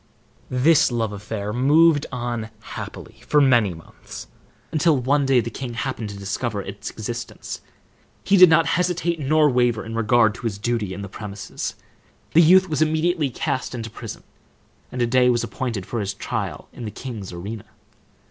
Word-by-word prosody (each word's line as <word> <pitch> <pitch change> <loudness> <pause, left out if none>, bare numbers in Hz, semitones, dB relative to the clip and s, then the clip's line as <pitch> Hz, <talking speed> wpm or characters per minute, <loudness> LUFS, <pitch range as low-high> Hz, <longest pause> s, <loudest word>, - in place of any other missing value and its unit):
This 135 +3 +4
love 115 -3 -1
affair 105 0 -5
moved 145 +4 +4
on 120 -3 -3
happily - - -9
for 150 - +4
many 120 -8 +4
months, 80 - -11 0.5
until 155 -1 +3
one 135 +2 +1
day 130 -2 +4
the 115 +1 -5
king 120 0 -6
happened 115 -3 -3
to 100 - -8
discover 105 +2 -3
its 100 +1 -6
existence. 115 +2 -6 0.6
He 200 - +3
did 185 -2 +9
not 160 0 +5
hesitate 175 -1 0
nor 150 +2 +3
waver 120 -4 +1
in 115 - -6
regard 115 -1 +3
to 120 - -4
his 100 -3 -4
duty 105 -3 -2
in 100 - -6
the - - -5
premises. 100 0 -6 0.6
The 165 - +7
youth 185 +3 +6
was 155 -3 -1
immediately 160 0 +1
cast 130 +1 -3
into 115 -2 -6
prison, - - -8 0.7
and 125 -1 -1
a - - +3
day 125 +1 +4
was 120 -1 +2
appointed 115 -4 -4
for 120 - -3
his 100 -1 -3
trial - - -4
in 120 - -7
the - - -3
king's 110 -4 -7
arena. 100 +5 -7
120 Hz, 170 wpm, -23 LUFS, 110-145 Hz, 0.7 s, did